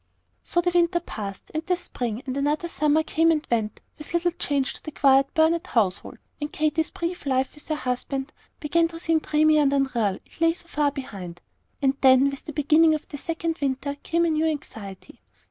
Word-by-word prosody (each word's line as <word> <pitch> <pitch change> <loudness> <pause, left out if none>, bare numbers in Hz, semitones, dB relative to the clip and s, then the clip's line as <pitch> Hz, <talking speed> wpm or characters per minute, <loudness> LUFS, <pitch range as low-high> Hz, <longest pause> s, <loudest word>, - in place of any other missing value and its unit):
So 345 - 0
the 355 0 +1
winter 345 0 +3
passed, 200 - -7
and 315 0 -2
the 360 +1 +1
spring; 245 -8 -4
and 260 -1 -3
another 295 +4 0
summer 305 0 +2
came 325 +1 +2
and 315 -2 +1
went, 220 -2 -1 0.2
with 300 +3 -5
little 350 +1 +2
change 285 -5 -1
to - - -10
the - - -5
quiet 275 -2 +4
Burnet 325 +1 +3
household, 200 -6 0 0.2
and 295 +1 -3
Katy's 310 +1 0
brief 340 -2 -4
life 260 0 +1
with 295 - -12
her 310 - 0
husband 270 +1 -3 0.3
began 330 +2 +2
to 330 0 -9
seem 325 -1 +2
dreamy 310 0 +3
and 285 -2 +3
unreal, 250 -8 +1
it - - -17
lay 330 0 +4
so 345 0 -8
far 295 -3 +1
behind. 195 -11 -7 0.4
And 270 0 +2
then, 265 +1 +6
with 275 - -9
the 310 - -5
beginning 310 +2 +4
of 305 - -7
the 290 - -7
second 330 +1 -3
winter 280 +1 -1
came 335 +1 +1
a 335 - +1
new 315 +1 +1
anxiety. 220 -11 -7
300 Hz, 200 wpm, -25 LUFS, 270-325 Hz, 0.4 s, then